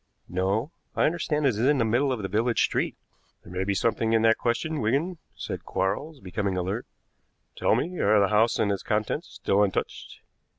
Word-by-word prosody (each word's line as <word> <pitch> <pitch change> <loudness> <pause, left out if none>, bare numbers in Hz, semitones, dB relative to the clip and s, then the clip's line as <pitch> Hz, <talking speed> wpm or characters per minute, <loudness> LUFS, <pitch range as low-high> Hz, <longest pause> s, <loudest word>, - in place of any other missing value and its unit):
"No. 100 - -1 0.2
I - - +2
understand 150 -2 0
it - - +6
is 110 -4 -2
in 140 +5 +3
the 115 - +2
middle 125 +5 +2
of 120 -5 -2
the - - -1
village 115 +4 +1
street." - - 0 0.5
"There - - -12
may 90 +1 -1
be 100 0 0
something 115 +1 +1
in 115 -1 +3
that 115 0 +4
question, 135 +6 -1
Wigan," 150 +11 0 0.2
said - - -5
Quarles, 140 +11 -2
becoming 95 0 -2
alert. 95 +6 -2 0.7
"Tell - - +2
me, 180 +2 -2
are 105 +1 +4
the 100 -1 +3
house 110 +2 +3
and 100 - +1
its 100 - -2
contents 110 - -1
still 100 0 0
untouched?" 100 -2 -2
110 Hz, 195 wpm, -26 LUFS, 100-135 Hz, 0.7 s, it